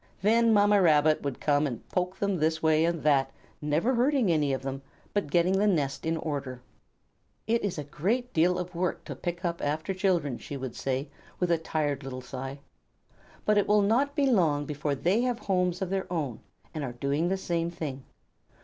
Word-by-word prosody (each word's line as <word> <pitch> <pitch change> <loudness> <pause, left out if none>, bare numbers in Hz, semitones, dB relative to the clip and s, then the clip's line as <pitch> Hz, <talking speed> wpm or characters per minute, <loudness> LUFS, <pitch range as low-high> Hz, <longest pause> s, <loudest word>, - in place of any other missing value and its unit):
Then 230 +2 +4
Mamma 205 -1 +5
Rabbit 155 -2 +4
would 140 -3 -4
come 145 0 +2
and 120 -5 -7
poke 180 +1 -1
them 200 -2 0
this 160 0 0
way 160 0 +4
and 170 -2 -1
that, 135 -3 +3 0.3
never 155 - +1
hurting 250 -4 +2
any 150 -3 +2
of 130 -1 -2
them, 135 0 -4 0.3
but 205 -7 -1
getting 180 +4 +3
the 210 - +3
nest 145 -6 0
in 165 0 +1
order. 140 -5 -4 0.9
"It 230 +1 +1
is 200 -5 -2
a 150 - -3
great 215 - -2
deal 175 +3 +3
of 180 0 -5
work 175 +1 -2
to - - -6
pick 175 +1 -4
up 170 0 -2
after 155 +6 -1
children," 175 -9 0
she 140 - -6
would 130 -3 -6
say 135 +2 -2 0.3
with 180 -1 +1
a 170 - +3
tired 150 -3 -1
little 130 -1 -6
sigh, 135 +2 -7 0.8
"but 210 -1 +4
it 205 - 0
will 210 0 +4
not 260 +8 +2
be 285 -2 +2
long 165 - +2
before 145 0 -2
they 180 - +1
have 250 -1 0
homes 180 -3 0
of 185 - -4
their 190 -2 -2
own 145 -9 -2 0.3
and 155 - -4
are 125 -3 -4
doing 140 +6 0
the 195 - 0
same 170 -2 -1
thing." 150 -6 -5
165 Hz, 200 wpm, -28 LUFS, 145-195 Hz, 0.9 s, Mamma